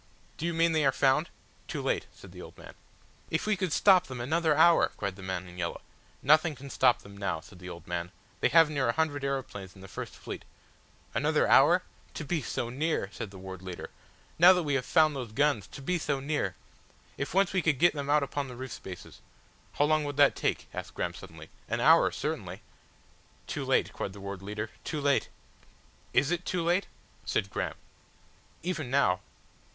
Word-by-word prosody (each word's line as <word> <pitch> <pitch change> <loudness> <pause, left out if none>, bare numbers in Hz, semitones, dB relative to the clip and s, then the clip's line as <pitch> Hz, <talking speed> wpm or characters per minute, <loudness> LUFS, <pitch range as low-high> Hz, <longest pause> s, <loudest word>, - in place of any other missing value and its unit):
"Do 165 - -2
you 170 - -1
mean 165 0 +3
they 160 -1 +2
are 135 - +4
found?" 135 +5 +2 0.4
"Too - - -4
late," - - -1
said - - -14
the - - -10
old - - -12
man. - - -12 0.6
"If - - -1
we 215 -1 +2
could 185 -3 -2
stop 185 +1 +5
them 130 -2 -7
another 155 +4 +1
hour!" 170 +1 +6
cried 100 -2 -3
the 95 - -12
man 95 -1 -4
in 90 0 -11
yellow. 85 -1 -3 0.4
"Nothing 155 +2 +4
can 140 +1 -10
stop 120 - +3
them 100 0 -12
now," 100 -5 -2
said 90 +3 -15
the 90 0 -8
old 85 -1 -9
man. 85 0 -4 0.3
"They - - +3
have 165 -1 +7
near 140 -5 0
a - - +2
hundred 150 -3 0
aeroplanes 130 -9 -4
in 95 - -14
the 95 - -10
first - - -7
fleet." - - -7 0.7
"Another - - +2
hour?" - - +7
asked - - -2
Graham. - - -30
"To - - -5
be 160 +1 -1
so 120 -1 -3
near!" 145 -6 -1
said 115 -2 -6
the 95 - -12
Ward 95 -1 -8
Leader. 95 -2 -7 0.5
"Now 180 +3 +9
that 180 -1 0
we 145 -2 -1
have 135 -2 0
found 155 -2 +4
those 120 -5 -5
guns. 140 -7 +1
To 140 - -10
be 180 +5 0
so 145 -3 -1
near. 135 -10 -1 0.6
If 140 +5 -4
once 195 -1 +3
we 185 - +2
could 155 -5 +2
get 175 +6 +5
them 140 -2 -4
out 150 0 +4
upon 140 0 -3
the 125 - -9
roof 130 0 -7
spaces." 90 -2 -9 0.5
"How 145 - +2
long 155 0 +2
would 145 -1 -4
that 145 -1 +6
take?" - - -1
asked - - -7
Graham - - -2
suddenly. - - -12 0.2
"An - - -1
hour - - +6
certainly." - - -4 0.8
"Too - - -4
late," - - +1
cried 95 - -4
the 100 - -11
Ward 100 -1 -6
Leader, 105 +2 -5
"too 155 - -3
late." 140 -1 +2 0.8
"Is 135 +4 +3
it 175 0 -1
too 180 -2 -1
late?" 175 +3 +1 0.4
said 95 - -1
Graham. - - -2 0.9
"Even 165 -7 -3
now 125 -10 +3
140 Hz, 210 wpm, -29 LUFS, 100-160 Hz, 0.9 s, Now